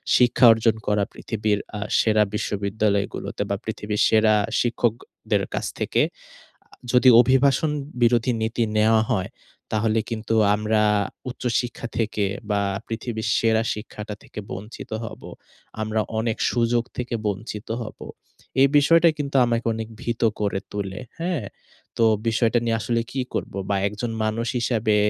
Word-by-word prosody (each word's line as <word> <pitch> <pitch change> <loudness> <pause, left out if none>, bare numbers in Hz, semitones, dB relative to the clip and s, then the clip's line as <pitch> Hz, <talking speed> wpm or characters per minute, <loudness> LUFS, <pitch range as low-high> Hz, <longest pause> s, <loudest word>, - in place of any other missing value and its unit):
শিক্ষা 125 +1 +5
অর্জন 115 0 +2
করা 105 -1 +2
পৃথিবীর 105 -2 -1 0.2
আ - - -5 0.2
সেরা 110 -1 +4
বিশ্ববিদ্যালয়গুলোতে 100 0 -1
বা, - - +1
পৃথিবীর 105 0 -2
সেরা 110 -1 +4 0.3
শিক্ষকদের 120 -1 -1
অ - - -19
কাছ - - -2
থেকে। - - +1 0.6
আ - - -43 0.3
যদি 125 0 +6
অভিবাসন 135 +4 +3 0.3
বিরোধী 120 +1 +3
নীতি 115 +2 0
নেওয়া 110 +1 +4
হয়, 95 -5 0 0.4
তাহলে 110 +1 +2
কিন্তু 115 -1 -2 0.2
আমরা 105 +1 +1 0.5
উচ্চশিক্ষা 120 -1 -2
থেকে 105 -2 0 0.3
বা, 100 0 +2 0.3
পৃথিবীর 115 0 -4
সেরা 110 -1 +2
শিক্ষাটা 105 -1 -7
থেকে - - -9
বঞ্চিত 105 +5 -8
হবো। - - -9 0.5
আমরা 110 0 0 0.2
অনেক 110 0 -1
সুযোগ 120 0 +1
থেকে 125 -1 -2
বঞ্চিত 105 +1 -4 0.2
হবো। - - -9 0.5
এই 140 - +7
বিষয়টা 165 +3 +5
কিন্তু 140 -1 -3
আমাকে 115 -1 -1
অনেক 110 0 -5
ভীত 120 -1 -3 0.2
করে 100 -2 0
তুলে। 100 -1 -4 0.2
হ্যাঁ? 170 - -1 0.5
তো 115 - +4 0.2
বিষয়টা 115 +1 +2
নিয়ে 115 -1 +1
আসলে 115 +2 0
কী 130 - -1
করবো? - - -3
বা 100 - +2
একজন 110 +3 -4
মানুষ 115 +2 -1
হিসাবে 110 -3 +1
110 Hz, 140 wpm, -23 LUFS, 105-120 Hz, 0.6 s, এই